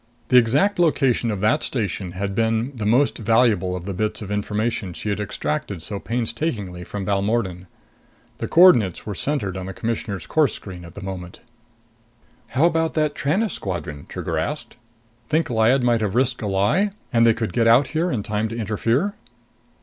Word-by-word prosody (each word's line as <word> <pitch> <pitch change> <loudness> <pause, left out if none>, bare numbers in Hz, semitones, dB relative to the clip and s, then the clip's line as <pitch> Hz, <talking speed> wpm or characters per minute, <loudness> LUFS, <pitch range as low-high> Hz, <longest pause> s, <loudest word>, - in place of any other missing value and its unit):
The 125 - +6
exact 140 - +3
location 135 -8 +2
of 105 -3 -2
that 125 +9 +2
station 100 -6 -3
had 100 +1 -3
been 115 +5 0
the 105 -3 -2
most 130 +6 +3
valuable 110 -4 +2
of 90 -1 -6
the 100 - -3
bits 105 +3 -2
of 100 - -7
information 105 -1 -2
she 105 - -5
had 100 0 -1
extracted 105 - -3
so 100 +1 -5
painstakingly 115 - -3
from 100 +2 -5
Balmordan. 100 -2 -1 0.7
The - - -2
coordinates 155 - +5
were 105 - -4
centered 105 - -2
on 95 0 -5
the 95 - -5
Commissioner's 110 -5 -3
course 155 -4 +2
screen 90 -3 -9
at 85 +1 -13
the 100 - -8
moment. 90 -2 -7 1.1
"How 135 +7 +2
about 165 -1 +1
that 155 -2 +1
Tranest 190 +11 0
squadron?" 85 -6 -5
Trigger - - -3
asked. - - -3 0.5
"Think 155 -3 +1
Lyad 120 +3 +3
might 120 -2 +2
have 105 -1 -1
risked 130 0 +1
a 105 - -2
lie, 105 - +1 0.2
and 115 -1 +4
they 115 -1 +5
could 115 -1 -3
get 115 -2 +2
out 120 +4 +5
here 165 +3 0
in 115 -10 -2
time 105 +1 -1
to 115 +1 -6
interfere?" 115 - 0
110 Hz, 180 wpm, -22 LUFS, 100-130 Hz, 1.1 s, The